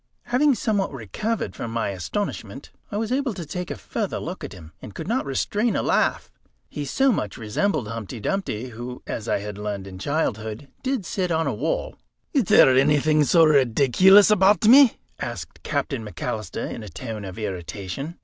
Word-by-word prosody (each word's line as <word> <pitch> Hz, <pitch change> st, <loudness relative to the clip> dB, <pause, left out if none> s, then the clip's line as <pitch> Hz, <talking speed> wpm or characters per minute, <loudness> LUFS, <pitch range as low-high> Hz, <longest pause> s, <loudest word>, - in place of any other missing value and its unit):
Having 270 Hz, +3 st, +3 dB
somewhat 205 Hz, -3 st, 0 dB
recovered 140 Hz, -, -3 dB
from 115 Hz, -, -5 dB
my 115 Hz, -2 st, -1 dB
astonishment, 100 Hz, -, -4 dB, 0.2 s
I 205 Hz, -, -2 dB
was 220 Hz, +2 st, -2 dB
able 260 Hz, -4 st, 0 dB
to 175 Hz, -, -6 dB
take 180 Hz, +3 st, -5 dB
a -, -, -3 dB
further -, -, -3 dB
look -, -, -6 dB
at -, -, -6 dB
him, 80 Hz, -3 st, -12 dB
and 100 Hz, -, -10 dB
could -, -, -6 dB
not 235 Hz, -, -1 dB
restrain 205 Hz, -, 0 dB
a -, -, 0 dB
laugh. -, -, +1 dB, 0.4 s
He 145 Hz, -, -5 dB
so 265 Hz, -, +2 dB
much 105 Hz, -, -2 dB
resembled 120 Hz, -, -1 dB
Humpty 115 Hz, +1 st, -6 dB
Dumpty, 130 Hz, -, -2 dB
who, 120 Hz, +2 st, -8 dB
as 110 Hz, -, -5 dB
I -, -, +2 dB
had 105 Hz, 0 st, -7 dB
learned 105 Hz, -2 st, -4 dB
in 95 Hz, -1 st, -9 dB
childhood, 110 Hz, -3 st, -2 dB
did 260 Hz, -7 st, -2 dB
sit 180 Hz, +1 st, -2 dB
on 160 Hz, 0 st, +1 dB
a 140 Hz, -, 0 dB
wall. 140 Hz, +10 st, -2 dB, 0.4 s
"Is 270 Hz, -8 st, +3 dB
there 130 Hz, -, +6 dB
anything 150 Hz, +2 st, +4 dB
so 165 Hz, +2 st, +5 dB
rideeculous 150 Hz, -, +5 dB
about 205 Hz, +1 st, +4 dB
me?" 255 Hz, +2 st, +7 dB, 0.2 s
asked -, -, -6 dB
Captain 135 Hz, -7 st, -2 dB
McAlister 110 Hz, -1 st, -4 dB
in -, -, -7 dB
a 105 Hz, -, -8 dB
tone 110 Hz, +3 st, -6 dB
of 95 Hz, 0 st, -8 dB
irritation. 100 Hz, -, -5 dB
140 Hz, 180 wpm, -24 LUFS, -, 0.4 s, me